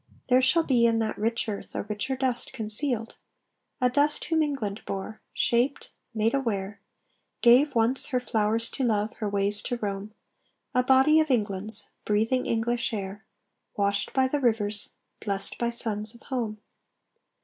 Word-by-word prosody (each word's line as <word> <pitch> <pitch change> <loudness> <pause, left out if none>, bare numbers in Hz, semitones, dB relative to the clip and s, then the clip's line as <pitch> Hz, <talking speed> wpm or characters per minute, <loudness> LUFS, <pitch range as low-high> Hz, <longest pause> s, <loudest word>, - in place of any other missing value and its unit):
There 255 +1 +5
shall 295 +6 +4
be 240 -6 +3
In 230 -1 +2
that 220 -1 -1
rich 230 +2 0
earth 205 -2 -6
a - - -2
richer 210 +5 -3
dust 260 -2 -2
concealed; 225 0 -1 0.6
A 250 - +3
dust 290 +4 +1
whom 325 -1 +1
England 235 -9 -2
bore, 200 +3 -5
shaped, 245 +4 0 0.2
made 225 0 +1
aware, 205 -7 -2 0.6
Gave, 255 +4 +5
once, 230 +3 +4
her 255 -3 0
flowers 225 -1 0
to 270 - -3
love, 215 -2 +1
her 210 - -2
ways 200 +1 +1
to 245 - -3
roam, 205 0 -4 0.6
A 250 - +4
body 265 +5 +5
of 310 -1 +1
England's, 215 -3 0
breathing 225 +5 +1
English 235 +2 0
air, 200 +1 -6 0.5
Washed 200 0 0
by 260 -1 +2
the 290 +3 -1
rivers, 215 -5 0 0.3
blest 200 -2 -2
by 235 - +1
suns 220 -2 -3
of 235 - -17
home. 230 -5 -3
230 Hz, 155 wpm, -27 LUFS, 210-255 Hz, 0.6 s, There